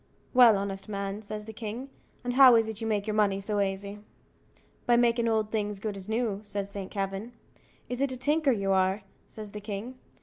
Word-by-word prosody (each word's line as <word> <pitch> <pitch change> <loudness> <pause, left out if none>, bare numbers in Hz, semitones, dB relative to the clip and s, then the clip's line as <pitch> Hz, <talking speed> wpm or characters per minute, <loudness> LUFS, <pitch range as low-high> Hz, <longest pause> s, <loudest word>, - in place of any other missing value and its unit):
"Well, 240 -5 +7
honest 195 +1 -4
man," 200 0 -3
says 210 0 -6
the 220 - -8
king, 230 +5 -6 0.3
"and 245 0 -2
how 260 -2 +8
is 225 -1 +3
it 220 0 -6
you 225 - -2
make 210 -2 0
your 215 - -2
money 205 -2 +2
so 205 +1 -1
aisy?" 200 +1 -2 0.9
"By 240 - +5
makin' 235 -1 +3
old 220 -1 +1
things 210 -2 -1
as - - -9
good 210 0 -3
as 195 +1 -8
new," 220 -3 0
says 200 -1 -3
Saint 200 -2 -5
Kavin. 195 +3 -4 0.5
"Is 250 +1 -3
it 275 -1 +1
a 255 - -3
tinker 295 +3 +2
you 200 -4 0
are?" 190 +1 +2 0.2
says 215 -2 -9
the 210 - -7
king. 215 +5 -6
210 Hz, 210 wpm, -28 LUFS, 200-235 Hz, 0.9 s, how